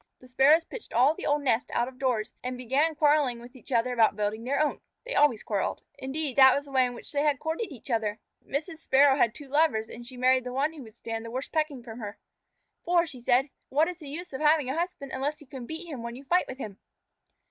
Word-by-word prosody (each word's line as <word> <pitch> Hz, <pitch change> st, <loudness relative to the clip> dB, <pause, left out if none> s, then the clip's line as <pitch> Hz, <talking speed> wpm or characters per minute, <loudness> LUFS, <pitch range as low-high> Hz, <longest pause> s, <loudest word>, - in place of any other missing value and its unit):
The 255 Hz, -, -16 dB
Sparrows 275 Hz, +6 st, +5 dB
pitched 470 Hz, +6 st, -10 dB
all 255 Hz, +6 st, +5 dB
the -, -, -5 dB
old 290 Hz, 0 st, +1 dB
nest 250 Hz, 0 st, +1 dB
out 240 Hz, -, +2 dB
of 260 Hz, 0 st, -11 dB
doors 245 Hz, -5 st, 0 dB
and 250 Hz, 0 st, -3 dB
began 275 Hz, +6 st, +1 dB
quarrelling 290 Hz, -5 st, +3 dB
with 245 Hz, +2 st, -13 dB
each 255 Hz, -, -15 dB
other 245 Hz, +1 st, +2 dB
about 225 Hz, -3 st, +4 dB
building 210 Hz, +2 st, -2 dB
their 270 Hz, +4 st, 0 dB
own. 305 Hz, -1 st, 0 dB, 0.2 s
They -, -, -4 dB
always 285 Hz, -7 st, +3 dB
quarrelled. 205 Hz, -3 st, -2 dB, 0.2 s
Indeed, 275 Hz, +1 st, -3 dB
that 265 Hz, -1 st, +8 dB
was 285 Hz, -, -2 dB
the 280 Hz, -, -13 dB
way 260 Hz, -2 st, +4 dB
in 245 Hz, -, -7 dB
which -, -, -9 dB
they 285 Hz, -, 0 dB
had 295 Hz, -2 st, +2 dB
courted 320 Hz, -, -3 dB
each 265 Hz, -1 st, -9 dB
other. 220 Hz, -2 st, 0 dB, 0.3 s
Mrs. 315 Hz, +4 st, -4 dB
Sparrow 275 Hz, -2 st, +4 dB
had 235 Hz, -4 st, +2 dB
two 290 Hz, -, -9 dB
lovers, 270 Hz, -6 st, +2 dB
and 240 Hz, -, -9 dB
she 250 Hz, +1 st, -11 dB
married 255 Hz, 0 st, +3 dB
the 250 Hz, -, -5 dB
one 285 Hz, +4 st, 0 dB
who 305 Hz, -, -10 dB
would 220 Hz, -3 st, -13 dB
stand 225 Hz, -1 st, -5 dB
the 230 Hz, -, -7 dB
worst 255 Hz, +4 st, -5 dB
pecking 305 Hz, -6 st, -1 dB
from 230 Hz, 0 st, -9 dB
her. 210 Hz, -2 st, -6 dB, 0.7 s
"For," 345 Hz, 0 st, +3 dB
she 280 Hz, -6 st, -9 dB
said, 255 Hz, +3 st, +2 dB, 0.2 s
"what 300 Hz, +4 st, +3 dB
is 360 Hz, -1 st, -6 dB
the 300 Hz, -4 st, -9 dB
use 340 Hz, +2 st, -7 dB
of 265 Hz, -, -5 dB
having 300 Hz, -3 st, +3 dB
a -, -, -3 dB
husband 330 Hz, -5 st, -3 dB
unless 285 Hz, +4 st, -2 dB
you 295 Hz, -, -14 dB
can 255 Hz, -2 st, -9 dB
beat 320 Hz, +2 st, -5 dB
him 280 Hz, -7 st, -6 dB
when 235 Hz, 0 st, -6 dB
you 265 Hz, -, -10 dB
fight 355 Hz, +6 st, +2 dB
with 260 Hz, -, -7 dB
him?" 210 Hz, -7 st, -7 dB
265 Hz, 255 wpm, -28 LUFS, 240-300 Hz, 0.7 s, that